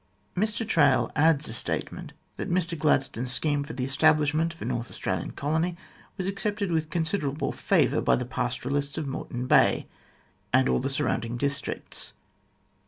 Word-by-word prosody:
Mr 215 +4 0
Traill 150 -9 +4
adds 150 0 +4
a 110 - -4
statement 120 - -3 0.3
that - - -4
Mr 175 -1 +1
Gladstone's 135 -5 +1
scheme 145 +2 +1
for 140 - -7
the 130 0 -2
establishment 155 +3 +3
of 165 - -14
a - - -5
North 120 -1 -2
Australian - - -3
colony 160 +4 -1 0.4
was 190 - -2
accepted 200 0 -1
with 160 -1 0
considerable 160 -4 -1
favour - - +2
by - - +4
the 125 - -2
pastoralists 130 +3 -2
of 155 - -2
Moreton 125 -2 -4
Bay - - +4 0.7
and - - +4
all 65 0 +2
the - - -1
surrounding 115 +1 -1
districts. 140 +2 -3
150 Hz, 155 wpm, -27 LUFS, 130-170 Hz, 0.7 s, Traill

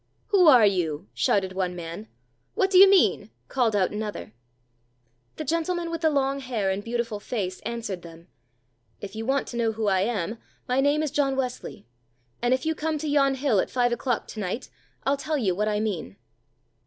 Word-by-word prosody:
"Who 375 -4 +5
are 250 -7 +8
you?" 180 -3 0
shouted 190 -2 +1
one 185 -1 -2
man. 170 +5 -7 0.5
"What 385 0 +1
do 370 - +7
you 390 0 +10
mean?" 390 -1 +3 0.2
called 240 -5 +1
out 190 -3 +2
another. 210 - -5 1.0
The - - -5
gentleman 335 +2 -1
with 330 0 -4
the 320 - +4
long 275 -1 0
hair 230 -7 -1
and 195 +2 -3
beautiful 230 -2 -3
face 195 -5 -4
answered 225 -6 -5
them: 165 0 -13 0.7
"If 200 +1 -8
you 225 +1 -5
want 275 +1 +1
to 240 - -6
know 230 -1 +1
who 220 0 -3
I 190 -1 +2
am, 215 0 -2 0.3
my 255 +2 +2
name 290 +2 +2
is 300 - -2
John 275 -2 +1
Wesley, 255 - -4 0.6
and 245 - +1
if 260 +2 +1
you 320 - +1
come 315 0 -2
to 305 +1 -4
yon 275 -2 +3
hill 265 -6 +1
at - - 0
five 245 -1 +1
o'clock 240 0 -1
to 220 - -7
night, 205 +5 -4 0.3
I'll 275 +1 +1
tell 305 +2 -2
you 205 -9 +1
what 210 +4 -1
I 210 -1 0
mean." 180 - -3
235 Hz, 195 wpm, -25 LUFS, 200-280 Hz, 1.0 s, you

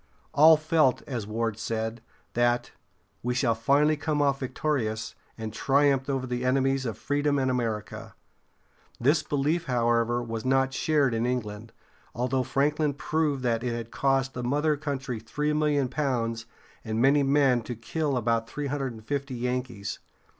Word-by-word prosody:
All 155 +2 +7
felt, 155 -4 +2
as 120 -7 -4
Ward 110 0 -2
said, 110 +1 -3 0.3
that 120 0 +1 0.5
"We 125 +1 -1
shall 120 -2 +2
finally 140 +7 +3
come 150 0 -1
off 140 -1 +2
victorious, 125 -5 -2 0.2
and 110 -1 -5
triumph 140 +1 +2
over 135 -2 -1
the 125 0 -3
enemies 135 0 +1
of 115 - -4
freedom 145 0 0
and 130 -1 +1
America." 115 -4 -3 0.8
This 145 +6 +3
belief, 150 +3 0
however, 120 -1 +1
was 115 -1 -4
not 135 0 +2
shared 145 -3 +2
in 115 +1 0
England, 110 -3 -3 0.4
although 125 +2 0
Franklin 145 +3 0
proved 150 -3 -1
that 115 -1 0
it 120 -2 -1
had 115 -1 -6
cost 135 -1 +1
the 125 - -4
mother 150 +5 +1
country 135 -5 -4
three 150 +7 -2
million 150 -3 +2
pounds 120 -4 -2 0.4
and 110 -1 -2
many 140 +4 +5
men 135 -3 +3
to 120 +2 -6
kill 135 +5 -2
about 115 -1 0
three 145 0 -4
hundred 135 -2 -2
and 110 -1 -13
fifty 140 0 -3
Yankees. 125 -4 -3
130 Hz, 155 wpm, -27 LUFS, 115-145 Hz, 0.8 s, All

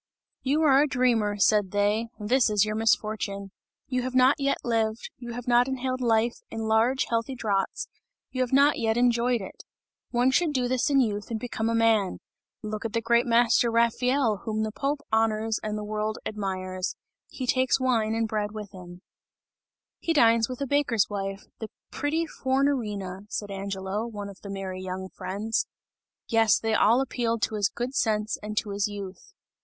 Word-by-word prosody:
"You 290 +4 +1
are 275 -2 +6
a 300 - +3
dreamer," 235 -6 +1
said 205 -1 +3
they, 205 +3 +1
"this 235 +4 +2
is 210 -1 +3
your 215 - -2
misfortune! 215 -2 0 0.4
You 255 -1 -1
have 255 +1 -4
not 260 +3 +5
yet 275 0 +1
lived, 225 -1 -1
you 240 -1 -7
have 245 +1 -7
not 245 +1 +4
inhaled 260 -1 -2
life 230 0 +2
in 225 - -5
large 225 +4 +2
healthy 230 +3 -1
draughts, 200 -5 -1 0.4
you 255 - -2
have 250 - 0
not 280 +2 +4
yet 225 -1 +1
enjoyed 240 -1 +2
it. 190 - -10 0.5
One 245 +2 +2
should 315 +2 +2
do 255 -3 +1
this 255 +1 +1
in 275 -1 +4
youth 210 -4 -2
and 225 -2 -2
become 225 -2 -2
a 230 - 0
man! 225 -4 +2 0.5
Look 215 0 -4
at 225 - -4
the 230 - +2
great 235 +1 +2
master 235 0 +4
Raphael 235 +1 +2
whom 215 +2 -3
the 215 - -2
Pope 280 +5 -2
honours 220 0 +1
and 215 0 -3
the 210 - -4
world 215 +1 -2
admires, 185 -3 -3 0.3
he 260 - -5
takes 255 +1 +2
wine 230 -4 +1
and 225 0 0
bread 210 -1 -2
with 210 -2 -7
him." 180 -1 -12 1.0
"He 330 - 0
dines 230 -5 +4
with 255 - -5
the 280 - -2
baker's 255 -7 +1
wife, 195 0 -4 0.2
the 220 - -6 0.2
pretty 315 +3 -1
Fornarina!" 225 - -1
said 205 -1 -4
Angelo, 195 +2 -3
one 205 -3 -6
of 195 - -13
the 200 - -9
merry 190 -1 -5
young 185 0 -5
friends. 205 +6 -2 0.6
Yes, 225 -2 +4
they 225 -1 -1
all 230 +4 +4
appealed 235 -4 -1
to - - 0
his 205 -2 +1
good 245 +2 -4
sense 215 -4 0
and 210 0 -6
to 215 -2 -1
his 200 +1 0
youth. 200 -3 -8
225 Hz, 180 wpm, -26 LUFS, 210-250 Hz, 1.0 s, are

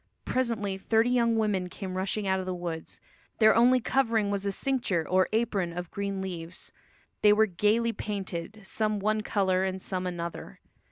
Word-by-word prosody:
Presently 220 -6 -1
thirty 225 +4 +2
young 235 -2 +3
women 200 -5 0
came 185 0 -6
rushing 195 +2 -1
out 190 0 +1
of 185 - -5
the 185 - -2
woods. 170 -2 -6 0.4
Their 220 -1 +6
only 245 +2 +5
covering 230 -5 +1
was 200 0 -1
a - - +1
cincture 195 - -1
or 185 0 +3
apron 205 -6 0
of 180 -1 -5
green 200 -1 -3
leaves; 175 -2 -5 0.5
they 210 - +7
were 215 +1 +5
gaily 215 +5 +1
painted, 200 -1 -5
some 215 +2 0
one 215 +2 +1
colour 190 -3 +1
and 190 0 -2
some 185 -1 -3
another. 170 - -6
200 Hz, 170 wpm, -28 LUFS, 185-220 Hz, 0.5 s, they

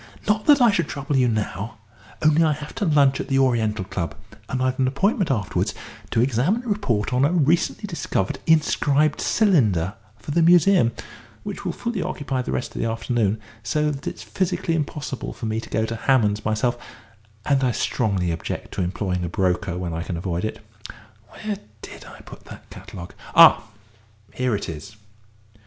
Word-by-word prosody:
Not 210 +1 +1
that 290 -2 +7
I 235 - +6
should 170 -6 0
trouble 140 0 -3
you 130 -2 +4
now, 110 -1 -3 0.5
only 155 +1 +5
I 155 -1 +3
have 150 +1 -8
to 205 - -2
lunch 140 -4 +3
at - - -4
the 135 - +1
Oriental 110 -6 +1
Club, 85 -3 -4 0.3
and 130 - -2
I've 130 0 0
an 130 - +3
appointment 190 - +1
afterwards 105 -8 -1 0.3
to 115 - +1
examine 135 - +1
and 235 - -3
report 125 - -1
on 125 +2 +3
a 145 - +3
recently 170 +5 +1
discovered 165 - -2
inscribed 150 -2 +2
cylinder 110 - +2 0.2
for - - -7
the 170 - +2
Museum, 175 -5 +5 0.5
which - - -6
will - - 0
fully 235 -5 -3
occupy 135 -5 -2
the - - -4
rest - - -3
of - - -3
the - - 0
afternoon, 115 -2 0 0.2
so 150 +6 0
that 140 -1 -7
it's - - -5
physically 175 -2 -1
impossible 150 -4 -3
for - - -7
me 110 0 -1
to - - -11
go 110 - 0
to 115 - -4
Hammond's 110 -4 +2
myself, 120 +3 0 0.7
and 140 -2 +2
I 130 - +3
strongly 100 -8 0
object 80 - -5
to - - -2
employing 90 0 -2
a 85 - -2
broker 90 0 0
when 90 -2 -4
I 80 - -3
can 85 0 -4
avoid 85 0 -3
it. 110 0 -5 0.6
Where 210 -2 -5 0.2
did - - -10
I - - -12
put - - -13
that - - -13
catalogue?... 85 0 -10 0.2
Ah, 115 - +8 0.7
here 125 -3 0
it 100 - -4
is. 80 +6 -8
130 Hz, 180 wpm, -23 LUFS, 105-155 Hz, 0.7 s, Ah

